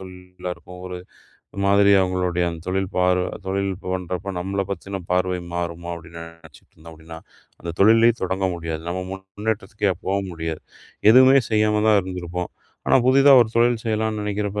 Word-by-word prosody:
தொழிலாருக்கும். 90 -1 -9
ஒரு 90 -1 -6 0.7
மாதிரி 100 0 +4
அவங்களுடைய 90 -1 0 0.2
தொழில், 95 0 -1
பார்வ, 90 0 +2 0.2
தொழில் 100 +1 -1
பண்றப்போ 90 0 -4
நம்மள 95 +2 -2
பத்தின 95 +1 -5
பார்வை 90 0 +1 0.2
மாறுமோ 85 0 -4
அப்டினு 85 0 -11
நெனைச்சுட்டு 85 -2 -17
இருந்தா 80 +1 -13
அப்டினா, 80 +1 -11 0.4
அந்தத் 85 0 -7
தொழிலே 115 +3 +6
தொடங்க 95 +1 -1
முடியாது. 80 -2 -5
நம்ம 90 +1 -3
முன்னேற்றத்திக்கே 100 +1 -3
போ 95 - 0 0.2
முடியாது. 80 -1 -5 0.5
எதுவுமே 130 +3 +7
செய்யாம 105 -1 +2
தான் 105 -2 +5
இருந்திருப்போம். 90 -1 -5 0.4
ஆனா - - +5
புதுதா 135 +2 +6
ஒரு 110 - -5
தொழில் 120 -1 +2
செய்யலாம்னு 110 -1 -1
நெனைக்கிறப்ப, 105 0 -2
95 Hz, 140 wpm, -22 LUFS, 90-105 Hz, 0.7 s, எதுவுமே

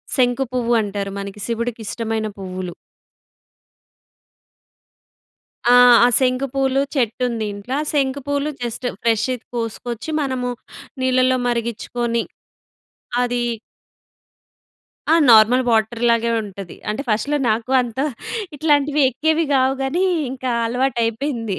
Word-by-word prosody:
శంకు 250 0 +2
పువ్వు 240 -1 0
అంటారు 200 -1 -4
మనకి 200 +1 -7
శివుడికి 235 0 -3
ఇష్టమైన 225 -1 -2
పువ్వులు. 185 -2 -6 2.9
ఆ! 245 - +6 0.3
ఆ - - +7
శంకు 255 +1 +1
పూలు 270 0 +1
చెట్టు 250 -2 0
ఉంది 225 -3 -3
ఇంట్ల 205 +5 -8 0.2
శంకు 275 -2 0
పూలు 285 +1 -1
జస్ట్ 240 +1 -3 0.2
ఫ్రెష్‌ది 235 +2 0
కోసుకొచ్చి 235 +4 -4
మనము 260 -3 -2 0.5
నీళ్లలో 255 0 +3
మరిగించుకొని 235 0 -2 1.0
అది 245 0 0 1.7
ఆ! - - +7 0.2
నార్మల్ 230 +3 +6
వాటర్ 225 +1 +1
లాగే 230 0 +2
ఉంటది. 195 -3 -9
అంటే 215 +6 -3
ఫస్ట్‌లో 225 +7 0
నాకు 225 +3 -1
అంత 240 0 -7 0.6
ఇట్లాంటివి 295 0 +2
ఎక్కేవి 315 +5 +1
కావు 265 0 +3
కాని 310 +8 0 0.3
ఇంకా 260 -1 -4 0.2
అలవాటయిపోయింది. 235 -2 -1
240 Hz, 105 wpm, -20 LUFS, 225-265 Hz, 2.9 s, ఆ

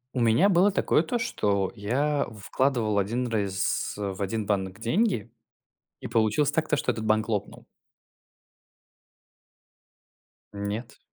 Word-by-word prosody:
У 125 - 0
меня 115 - +4
было 195 +1 +4
такое 170 - +2
то, 240 +9 -2
что 100 - 0
я 140 +8 0 0.2
вкладывал 115 -7 +1
один 120 +6 -1
раз 100 -4 -1
в 100 -1 -4
один 105 +2 -2
банк 95 -1 -2
деньги 120 - 0 0.7
и - - -6
получилось 115 +6 +2
так, 160 0 0
то 150 - +2
что 125 - 0
этот 110 -1 -5
банк 110 +1 +1
лопнул. 105 -2 -3 2.9
Нет. 105 +3 -5
115 Hz, 125 wpm, -26 LUFS, 100-140 Hz, 2.9 s, меня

